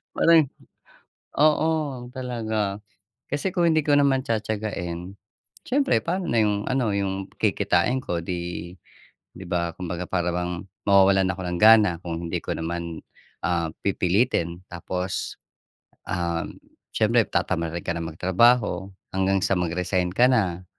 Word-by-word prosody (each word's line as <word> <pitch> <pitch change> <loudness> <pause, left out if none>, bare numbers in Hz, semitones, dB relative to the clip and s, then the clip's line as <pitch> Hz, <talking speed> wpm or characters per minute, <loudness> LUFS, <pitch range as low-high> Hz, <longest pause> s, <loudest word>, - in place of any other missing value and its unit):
Parang 160 -5 +5 0.9
oo, 155 +1 +4 0.4
talaga 110 -6 -2 0.5
kasi 145 +7 -1
kung 175 -2 +2
hindi 155 - +3
ko 145 -1 +3
naman 140 -2 +3
tiyatiyagahin, 100 -5 -3 0.5
siyempre 275 +2 +2
paano 180 +2 -2
na 115 - +1
yung 105 -1 +1
ano 125 -6 +1
yung 95 -1 -2
kikitain 100 +2 +1
ko 85 -8 -3
di 85 0 -5 0.6
di 95 - -10
ba? 85 -1 -1
Kumbaga 90 0 -4
parang 90 -1 0
bang 90 0 -2 0.4
mawawalan 95 -1 +5
ako 95 - -8
ng 90 0 -2
gana 110 -3 +7
kung 85 0 -4
hindi - - -2
ko - - -2
naman, 85 0 -4 0.4
um, 85 -3 0 0.2
pipilitin 90 -2 +1
tapos, 90 +1 -4 0.7
um, 85 -1 -2 0.4
siyempre - - +3
tatamarin 85 -2 -1
ka 85 - -1
nang 85 -1 -4
magtrabaho 100 +3 +2 0.2
hanggang 95 +1 +2
sa - - +2
mag-resign 90 +1 0
ka 125 - +6
na. 95 -7 +1
95 Hz, 130 wpm, -24 LUFS, 85-115 Hz, 0.9 s, gana